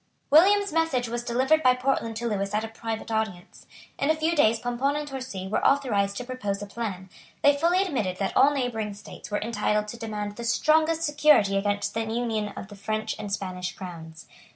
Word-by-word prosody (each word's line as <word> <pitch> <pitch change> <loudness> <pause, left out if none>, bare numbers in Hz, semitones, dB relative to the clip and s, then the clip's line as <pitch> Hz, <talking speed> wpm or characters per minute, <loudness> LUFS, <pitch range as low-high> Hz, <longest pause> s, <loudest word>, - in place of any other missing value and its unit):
William's 400 +5 +5
message 325 -7 +1
was 235 +1 -3
delivered 260 +6 +2
by 255 -3 +5
Portland 250 -3 -1
to 235 +2 -3
Lewis 200 -2 -2
at 215 - 0
a - - -3
private 225 0 -5
audience. 215 -5 -4 0.3
In 280 - +1
a 315 - +4
few 320 +2 0
days 230 -6 +4
Pomponne 245 +4 -1
and 295 0 -3
Torcy 255 -9 -6
were 205 - -1
authorised 205 -8 +2
to - - -3
propose 240 -6 -3
a 205 - -5
plan. 200 -3 -5 0.4
They 285 0 +6
fully 345 +6 +2
admitted 225 - -2
that 195 - -2
all 275 - +6
neighbouring 230 -7 -2
states 205 - -11
were 210 - -1
entitled 210 -1 0
to 235 - -7
demand 210 -2 -5
the 235 - -6
strongest 315 +7 +2
security 295 -10 +4
against 205 0 0
the 225 - -1
union 225 -1 -2
of 190 - -7
the 205 - -10
French 215 +2 -3
and 205 -2 -5
Spanish 180 -2 -3
crowns. 165 -4 -9
225 Hz, 200 wpm, -26 LUFS, 205-275 Hz, 0.4 s, They